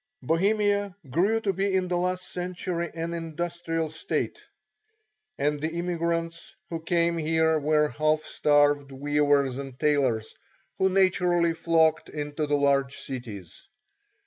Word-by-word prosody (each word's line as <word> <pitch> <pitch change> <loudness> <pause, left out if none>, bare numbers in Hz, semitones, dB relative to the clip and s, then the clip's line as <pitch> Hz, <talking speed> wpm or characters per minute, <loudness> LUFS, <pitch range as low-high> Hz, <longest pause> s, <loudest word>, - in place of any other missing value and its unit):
Bohemia 205 +3 +1 0.2
grew 195 - +2
to 200 -3 0
be 195 +1 0
in 185 -1 +1
the 180 - -1
last 180 +1 -1
century 180 -1 -3
an 165 +1 -3
industrial 165 0 -3
state, 160 - -3 1.0
and 145 0 0
the 160 +1 -2
immigrants 170 +2 -2 0.2
who 165 -1 -3
came 170 0 +1
here 160 0 +2
were 150 0 +2
half 155 +4 +1
starved 145 -1 +2
weavers 145 -1 +1
and 135 -2 -7
tailors, 135 -7 +1 0.5
who 190 - +4
naturally 180 -3 +3
flocked 165 -1 +2
to 150 0 -4
the 145 0 +2
large 140 -1 +1
cities. 105 -9 -8
165 Hz, 125 wpm, -26 LUFS, 145-175 Hz, 1.0 s, who